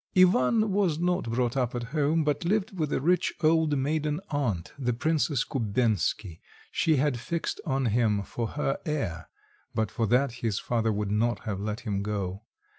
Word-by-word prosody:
Ivan 185 - +4
was 190 -6 +2
not 175 -5 0
brought 120 +1 0
up 125 -2 0
at 120 - -2
home, 155 +1 +2
but 150 0 0
lived 205 +3 0
with 155 -4 -1
a - - +1
rich 175 +6 +1
old 155 -2 +3
maiden 150 +2 0
aunt, 115 - -1
the 125 -2 0
Princess 145 +1 +1
Kubensky; 105 - 0 0.3
she 160 - +2
had 140 -3 +1
fixed 170 +7 -3
on 135 -2 +1
him 110 -3 +2
for 115 +3 -3
her 135 +2 -2
heir 100 - -3 0.5
(but 110 -2 0
for 115 -2 0
that 125 +4 +3
his 110 -4 0
father 115 -2 0
would 105 -1 -2
not 115 +3 +1
have 105 -4 -4
let 105 +3 -3
him 105 -5 -2
go). 100 -2 -3
125 Hz, 175 wpm, -28 LUFS, 110-155 Hz, 0.5 s, Ivan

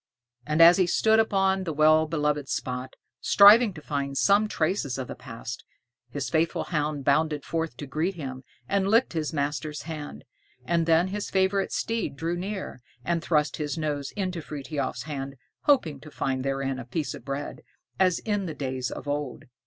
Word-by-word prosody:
And 155 +2 +5
as 170 +2 +8
he 185 -2 +3
stood 220 +5 +3
upon 195 -3 +2
the 165 -3 -3
well 155 +1 +4
loved 150 -3 -1
spot, 125 +1 -4 0.2
striving 210 - +7
to 150 - -10
find 140 -2 -3
some 205 +6 +4
traces 155 -8 -1
of 130 -2 -4
the - - -5
past, 120 -1 -8 0.5
his 140 +2 -4
faithful 165 0 0
hound 150 -4 -2
bounded 150 0 +2
forth 165 -1 -3
to 145 - -6
greet 160 +7 -2
him, 130 -5 -6 0.2
and 195 -1 +1
licked 225 +2 +3
his 155 -2 -2
master's 150 +1 -3
hand. 155 -3 -7 0.4
And 170 -1 +1
then 165 +3 +4
his 205 +1 -4
favorite 190 +1 +1
steed 225 -11 -2
drew 165 +4 -2
near, 190 -7 -5 0.2
and 170 -1 0
thrust 150 -3 +1
his 150 +1 -3
nose 145 -3 -2
into 185 -4 -3
Frithiof's 140 -4 -4
hand, 140 -2 -5 0.3
hoping 170 - +3
to 155 - -12
find 130 -3 -2
therein 135 -1 -2
a 125 - -7
piece 140 +4 -3
of - - -10
bread, 140 +2 -5 0.4
as 185 -2 +4
in 205 -3 -2
the 160 - -5
days 130 -3 -3
of - - -8
old. 145 -2 -3
155 Hz, 175 wpm, -26 LUFS, 140-180 Hz, 0.5 s, as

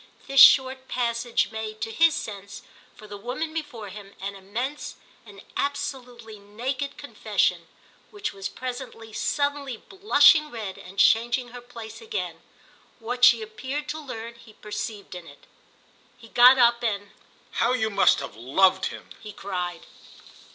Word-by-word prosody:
This 275 0 +2
short 260 -1 +7
passage 235 -1 -1
made, 220 -1 -6
to 225 - -3
his 330 +4 +4
sense, 200 -2 -7 0.3
for 215 - -14
the 205 -1 -9
woman 255 +9 -4
before 245 -10 -6
him, 200 0 -11
an 200 +1 -5
immense, 235 +10 -5 0.3
an 200 -1 -13
absolutely 245 -6 -4
naked 255 +7 -4
confession; - - -1 0.4
which 410 0 -5
was 195 -1 -5
presently, 245 -3 -7
suddenly 285 -1 -1
blushing 305 - +4
red 215 -7 -6
and 190 +2 -13
changing 240 +4 +3
her 245 +1 -10
place 235 - -10
again, 445 -1 -5 0.6
what 245 +2 -5
she 235 -2 +7
appeared 260 +8 -5
to 315 - -4
learn 235 -5 -7
he 235 -2 -17
perceived 210 -1 -6
in 175 -2 -9
it. 145 - -16 0.7
He 230 -2 -15
got 250 +3 +7
up 235 -1 +4
and 205 -3 -2 0.4
"How 240 +2 +1
you 220 -3 0
must 200 - +4
have 140 - -7
loved 185 - +3
him!" - - -10
he 215 - -8
cried. 180 -4 -5
235 Hz, 145 wpm, -25 LUFS, 205-260 Hz, 0.7 s, short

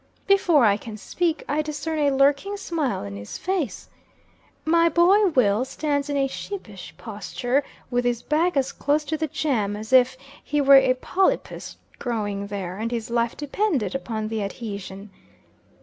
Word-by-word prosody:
Before 355 -9 +4
I 205 -1 +4
can 220 0 -8
speak, 330 - -1
I 300 +2 +1
discern 305 +1 -3
a 290 -1 +3
lurking 280 +9 +2
smile 320 - -2
in 100 0 -6
his 100 +1 -7
face. 345 - -2 0.8
My 335 +1 +4
boy 370 +6 +5
Will 245 - +3
stands 285 +1 -2
in 285 - 0
a 275 - +2
sheepish 250 - -7
posture, 245 +5 -2 0.3
with 245 0 +1
his 245 -1 -1
back 320 +2 +1
as 265 -1 +1
close 295 +1 0
to 310 +2 -1
the 315 0 -1
jam, 230 -9 -1
as 215 +4 -6
if 260 0 +5 0.3
he 295 - -1
were 280 -1 +6
a 260 -1 +4
polypus 375 +8 -1 0.2
growing 205 -4 -2
there, 195 -2 -5
and 225 +1 -2
his 230 -1 -4
life 235 0 0
depended 295 - -1
upon 220 -5 -3
the 220 -1 -2
adhesion. 200 -1 -6
265 Hz, 165 wpm, -24 LUFS, 215-310 Hz, 0.8 s, were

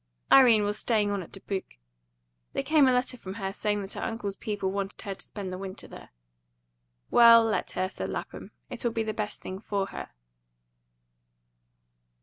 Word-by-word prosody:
Irene 235 -6 +7
was 205 +1 -1
staying 210 -3 +1
on 200 -1 -1
at 170 - -11
Dubuque. 195 - -6 0.8
There - - -1
came 305 -3 +4
a - - +5
letter 250 0 +1
from 190 -4 -8
her, 195 -2 -4
saying 205 -1 -1
that 195 - -3
her - - -6
uncle's 225 -3 -3
people 200 -2 -3
wanted 195 0 -4
her 200 - -4
to - - -5
spend 195 -3 -6
the 185 - -5
winter 190 -1 -6
there. - - -12 1.0
"Well, 230 -1 +8
let 220 - -1
her," 185 - 0
said 95 - -6
Lapham. - - -6 0.2
"It'll 240 - -1
be 225 0 -1
the 215 0 -3
best 210 0 -4
thing 190 +1 -6
for 200 -2 -2
her." - - -7
205 Hz, 175 wpm, -28 LUFS, 195-225 Hz, 1.0 s, Well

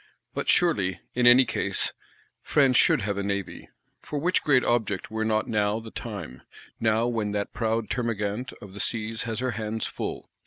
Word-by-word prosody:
But - - -2
surely, 100 - +3
in 125 0 +3
any 125 +2 +8
case, - - 0 0.5
France 135 -3 +3
should 160 0 +5
have 100 -1 -2
a - - -1
Navy. 100 -2 -4 0.3
For 150 - -5
which 175 +6 +1
great 130 -4 +4
object 110 -5 0
were 110 0 -1
not 110 -1 +1
now 105 0 +1
the 110 -1 -10
time: 65 0 -7 0.4
now 110 +1 +2
when 110 -4 -1
that 100 0 -2
proud 115 -1 -1
Termagant 115 0 -2
of 100 -2 -11
the 100 - -9
Seas 115 0 -2
has 115 +2 -3
her 130 -1 0
hands 110 0 -3
full? - - -5
110 Hz, 180 wpm, -26 LUFS, 105-120 Hz, 0.5 s, any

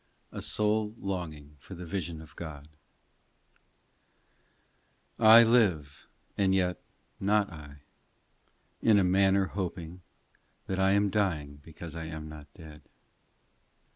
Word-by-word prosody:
A - - -7
SOUL 105 0 0
LONGING 80 -7 -6
FOR 95 - -11
THE 90 +1 -8
VISION 85 -2 -5
OF 80 - -17
GOD 75 -3 -9 2.5
I 115 +1 +9
LIVE, 95 - +1 0.3
and 95 -1 +2
yet 90 -3 0 0.4
not 100 0 +1
I, 75 -2 -12 1.0
In 110 -2 +5
a 100 - +4
manner 95 +1 +3
hoping 90 -2 -6 0.6
That 95 0 -3
I 95 +1 +3
am 100 0 +2
dying 80 -9 -1
because 80 +2 -10
I 80 -1 -5
am 80 -1 -7
not 75 -2 -12
dead. 75 -3 -12
90 Hz, 115 wpm, -29 LUFS, 75-100 Hz, 2.5 s, I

